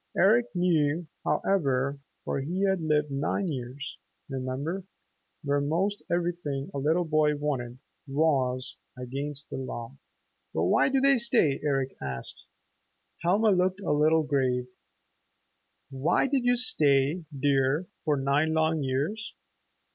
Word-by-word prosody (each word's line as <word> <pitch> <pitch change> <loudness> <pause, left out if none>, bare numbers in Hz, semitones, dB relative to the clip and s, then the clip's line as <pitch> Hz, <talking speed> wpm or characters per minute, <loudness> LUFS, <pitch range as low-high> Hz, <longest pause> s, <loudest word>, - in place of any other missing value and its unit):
Eric 225 +6 +4
knew, 165 -2 +1 0.2
however, 140 -7 0 0.3
for - - -1
he 175 +8 -2
had 190 -2 +2
lived 150 -2 +1
nine 150 +8 -1
years, 130 0 -6 0.3
remember, 135 +7 -3 0.6
where 145 0 +1
most 180 +8 0
everything 170 -5 -2
a 140 - -2
little 160 +5 +1
boy 155 -1 +2
wanted 130 -5 -3 0.3
was 135 -3 0 0.2
against 140 +3 -5
the - - -4
law. 130 0 -6 0.6
"But 80 - +1
why 90 - +3
do 270 0 +2
they 275 -2 +5
stay?" 160 -11 +3
Eric 135 -3 0
asked. 65 -2 -6 0.7
Helma 200 +6 +3
looked 185 +1 +1
a 195 - -1
little 155 +2 +3
grave. 130 -4 0 1.3
"Why 135 +4 +1
did 270 -2 0
you 245 0 +4
stay, 150 - +3
dear, 140 +3 +2 0.2
for 150 -3 +1
nine 140 +4 +1
long 160 0 +2
years?" 145 +12 -2
150 Hz, 125 wpm, -28 LUFS, 135-175 Hz, 1.3 s, they